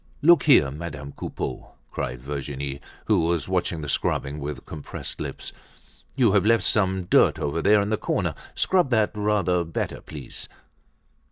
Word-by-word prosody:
"Look 170 +3 +6
here, 75 - +6
Madame 75 -2 -7
Coupeau!" 65 - -6 0.2
cried - - -4
Virginie, 70 0 -5 0.2
who - - +3
was 85 -3 0
watching 80 - -1
the 75 - -5
scrubbing 70 +1 -1
with 70 -2 -6
compressed 75 -2 -7
lips, - - -6 0.6
"you 125 -6 +4
have 100 -2 +3
left 115 -1 +3
some 95 -2 +1
dirt 90 - +4
over 75 +3 -2
there 105 +3 +5
in 105 - -3
the 110 - +2
corner. - - -1 0.2
Scrub 180 -7 +2
that 110 -4 +2
rather 105 -4 +1
better 80 -1 -4
please." 70 -5 -10
85 Hz, 155 wpm, -25 LUFS, 70-105 Hz, 0.6 s, Look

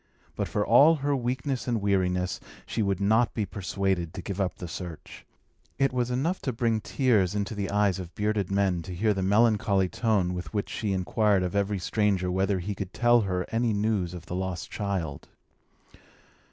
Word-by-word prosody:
But - - -2
for 105 - -1
all 145 +8 +7
her 145 -1 0
weakness 130 +1 -2
and 120 -2 +1
weariness, 90 -2 0 0.3
she 115 - -2
would 100 -3 0
not 110 +4 +2
be 110 - 0
persuaded 95 -3 -2
to 95 - -6
give 100 0 -3
up 90 -4 -1
the 90 - -7
search. 80 0 -8 0.5
It 135 -1 +2
was 125 -1 0
enough 145 +9 -1
to 130 - -1
bring 115 -2 0
tears 105 -9 +1
into 100 +2 -2
the 100 -2 -3
eyes 100 -2 +2
of 85 -3 -8
bearded 105 -2 0
men 95 -3 +1
to 90 +1 -7
hear 105 +4 +2
the 95 - -2
melancholy 100 -1 +3
tone 100 -6 +1
with 90 +4 -6
which 100 - -1
she 105 -2 -2
inquired 95 +1 +2
of 90 +2 -3
every 100 0 +1
stranger 95 -1 0
whether 95 +1 +1
he 95 +3 -3
could 95 -1 -6
tell 120 +1 +4
her 90 -3 -1
any 115 0 +1
news 100 -4 0
of 85 -1 -9
the 90 - -5
lost 95 -2 -4
child. 95 -8 -3
100 Hz, 190 wpm, -27 LUFS, 90-110 Hz, 0.5 s, all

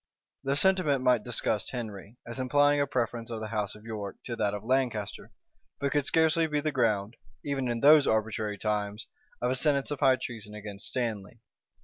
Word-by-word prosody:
The 135 0 0
sentiment 155 -6 +2
might 125 -4 +3
disgust 110 -2 -1
Henry, 110 -2 -7
as 115 +2 -6
implying 145 +2 +3
a 140 - +1
preference 120 -3 -2
of 115 -2 -4
the 110 0 -5
house 105 -2 -2
of 105 - -14
York 105 -3 -5
to 120 - -3
that 105 -2 0
of 105 - -6
Lancaster; 120 -4 -1 0.5
but 140 0 0
could 145 -2 +1
scarcely 160 0 +3
be 150 -1 0
the 155 +1 -1
ground, 115 -4 0 0.3
even 135 -3 -1
in 120 -1 -2
those 150 0 +7
arbitrary 110 -1 0
times, 105 0 -2 0.4
of 125 - +2
a - - +2
sentence 140 +1 +1
of 145 - -3
high 135 -3 +5
treason 110 -5 -7
against 105 -2 -8
Stanley. 115 -2 -3
120 Hz, 190 wpm, -29 LUFS, 105-140 Hz, 0.5 s, those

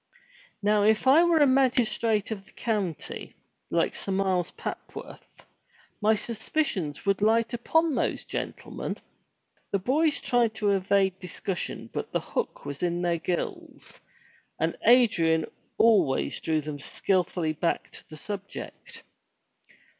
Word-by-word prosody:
Now 210 0 +3
if 215 +3 +3
I 280 +6 +7
were 345 -1 +4
a 295 - +6
magistrate 240 -5 +2
of 195 -3 -5
the 215 - -20
county, 205 -8 -3 0.3
like - - +1
Sir 195 - -4
Miles 190 -2 +1
Papworth, - - -9 0.6
my 215 +1 +4
suspicions 220 - -2
would 200 0 +1
light 230 +2 +3
upon 320 +7 +2
those - - -1
gentlemen." - - -5 0.7
The 200 - +1
boys 285 - +2
tried 235 -3 +2
to 205 -2 +1
evade 195 -1 +2
discussion 180 0 -4
but - - -4
the - - +1
hook - - -4
was 140 -1 -6
in 175 0 0
their 170 -1 +1
gills, 175 +2 -5 0.6
and - - 0
Adrian 190 -10 +5 0.3
always 215 -12 +3
drew 155 -1 0
them 150 -1 -6
skilfully 175 0 0
back 165 +2 -1
to - - -13
the 155 - -10
subject. 200 +4 -8
205 Hz, 130 wpm, -27 LUFS, 180-235 Hz, 0.7 s, I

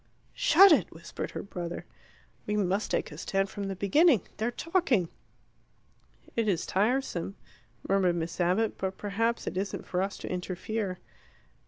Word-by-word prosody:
"Shut 400 -6 +7
it," 310 - +4
whispered - - -6
her - - -6
brother. 175 -3 -6 0.6
"We 210 0 0
must 195 +1 0
make - - -1
a 150 - -9
stand 195 +1 -1
from 200 - -4
the 195 0 -3
beginning. 230 - +4 0.2
They're 220 +2 0
talking." 260 - +1 1.3
"It 230 -2 +1
is 180 -5 +1
tiresome," 205 -3 0 0.5
murmured 190 -3 +3
Miss 165 +1 -3
Abbott; 185 +6 +1
"but 190 0 -3
perhaps 225 +3 -1
it - - -4
isn't 200 +1 -3
for 180 0 -1
us 195 +1 -2
to - - -7
interfere." 185 +2 -3
195 Hz, 150 wpm, -29 LUFS, 185-225 Hz, 1.3 s, Shut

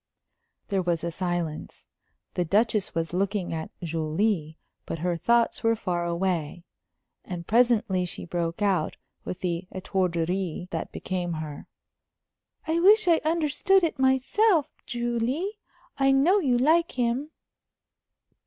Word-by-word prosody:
There 195 -2 +1
was 175 -2 -1
a 170 - -2
silence. 175 -3 -4 0.5
The 180 - 0
Duchess 210 +3 +1
was 165 0 -2
looking 195 -1 -1
at 160 -1 -4
Julie, 160 +1 -1 0.3
but - - -3
her 175 +2 -1
thoughts 235 +7 +2
were 230 0 +3
far 175 -5 -2
away. 170 -2 -2 0.6
And 175 -2 -6
presently 225 -5 +3
she 175 - -6
broke 170 +2 -2
out, 185 -6 +1 0.3
with 185 - -5
the 175 0 -2
étourderie 180 -1 -2
that - - -4
became 180 -2 -3
her: 155 -2 -6 1.0
"I 325 +1 +1
wish 415 +3 +6
I 335 -2 +4
understood 335 +4 +2
it 320 -4 -1
myself, 275 - +3 0.2
Julie. 240 - -2 0.4
I 270 0 +4
know 310 +10 +4
you 260 -9 +2
like 325 +7 +3
him." 250 +4 -1
195 Hz, 125 wpm, -26 LUFS, 170-265 Hz, 1.0 s, wish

